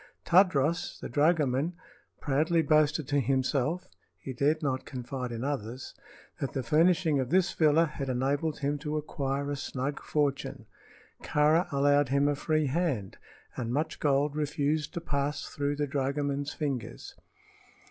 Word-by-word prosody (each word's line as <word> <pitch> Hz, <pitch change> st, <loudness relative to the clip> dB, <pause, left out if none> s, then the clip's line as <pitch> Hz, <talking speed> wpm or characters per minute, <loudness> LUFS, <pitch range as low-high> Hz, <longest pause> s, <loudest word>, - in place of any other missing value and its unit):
Tadros, 170 Hz, -3 st, +3 dB
the -, -, -6 dB
dragoman, 150 Hz, +1 st, +2 dB, 0.5 s
proudly 160 Hz, +4 st, +1 dB
boasted 155 Hz, -1 st, +2 dB
to 145 Hz, 0 st, +2 dB
himself 135 Hz, +6 st, 0 dB, 0.3 s
he 130 Hz, -, -7 dB
dared 150 Hz, +5 st, +1 dB
not 130 Hz, -2 st, -1 dB
confide 125 Hz, -1 st, -5 dB
in 115 Hz, +1 st, -4 dB
others 130 Hz, -3 st, -4 dB, 0.5 s
that 140 Hz, -, -3 dB
the 135 Hz, -, -2 dB
furnishing 160 Hz, +3 st, +3 dB
of 130 Hz, -2 st, -2 dB
this 185 Hz, +2 st, +2 dB
villa 160 Hz, +1 st, +4 dB
had 140 Hz, -3 st, -5 dB
enabled 140 Hz, +5 st, 0 dB
him 145 Hz, +1 st, -1 dB
to 150 Hz, +1 st, -3 dB
acquire 140 Hz, -1 st, -2 dB
a -, -, -1 dB
snug 135 Hz, +1 st, -4 dB
fortune. 145 Hz, -2 st, -1 dB, 0.6 s
Kāra 155 Hz, +4 st, +2 dB
allowed 145 Hz, -1 st, +3 dB
him 140 Hz, +1 st, +3 dB
a 145 Hz, -, +2 dB
free 155 Hz, +2 st, 0 dB
hand, 135 Hz, -, -1 dB, 0.4 s
and 120 Hz, -3 st, -3 dB
much 150 Hz, +5 st, -2 dB
gold 145 Hz, 0 st, +1 dB
refused 150 Hz, +1 st, -1 dB
to 170 Hz, -, -3 dB
pass 145 Hz, -1 st, -2 dB
through 145 Hz, 0 st, -2 dB
the 145 Hz, 0 st, -1 dB
dragoman's 140 Hz, +1 st, -1 dB
fingers. 140 Hz, -7 st, -4 dB
145 Hz, 145 wpm, -29 LUFS, 135-155 Hz, 0.6 s, villa